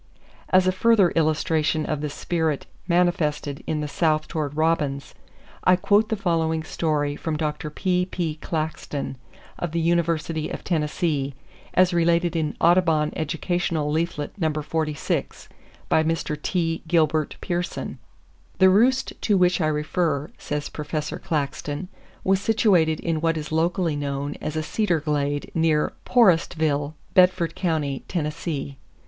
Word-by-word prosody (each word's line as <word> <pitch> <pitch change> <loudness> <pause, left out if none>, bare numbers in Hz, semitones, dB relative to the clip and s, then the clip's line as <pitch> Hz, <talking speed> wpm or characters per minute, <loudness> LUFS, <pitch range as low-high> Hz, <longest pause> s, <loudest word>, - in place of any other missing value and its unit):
As 185 0 +5
a 185 - +4
further 200 -1 +4
illustration 155 -1 +1
of 150 -2 -2
the 150 - -2
spirit 160 -1 -1 0.2
manifested 160 -5 +1
in 155 -1 -1
the 150 - -2
South 155 0 +1
toward 150 -2 -3
robins, 150 -4 0 0.5
I 185 - +6
quote 205 +4 +3
the 220 - +1
following 165 -5 0
story 150 -3 -1
from 155 0 -3
Dr. 150 0 -3
P.P. 180 -1 -1
Claxton, 155 -3 -3 0.4
of 175 -2 -3
the 170 - +1
University 165 -1 0
of - - -6
Tennessee, 150 -4 -1 0.4
as 185 0 +4
related 170 0 +2
in 155 -2 -1
Audubon 165 -3 +3
Educational 160 -1 -1
Leaflet 155 -2 -1
No. 160 -3 +1
46, 155 0 -2 0.4
by 160 - +3
Mr. 160 -1 -1
T. 165 -2 -1
Gilbert 160 -2 +2
Pearson:— 175 0 -3 0.6
"The 190 -1 +6
roost 250 +7 +3
to 205 -3 +2
which 180 0 +3
I 155 - +2
refer," 150 -1 -1
says 150 0 -3
Professor 150 0 -4
Claxton, 145 +2 -3 0.3
"was 190 0 +2
situated 185 -8 +3
in 165 -2 -1
what 165 0 +1
is 155 0 -5
locally 165 0 +1
known 145 0 -3
as 155 - -4
a 155 - -1
'cedar 175 0 0
glade,' 145 -1 -1
near 160 -2 +2
Porestville, 160 - +2 0.2
Bedford 180 -2 +4
Co., 155 -7 -1
Tennessee. 150 -4 -3
160 Hz, 135 wpm, -24 LUFS, 150-175 Hz, 0.6 s, I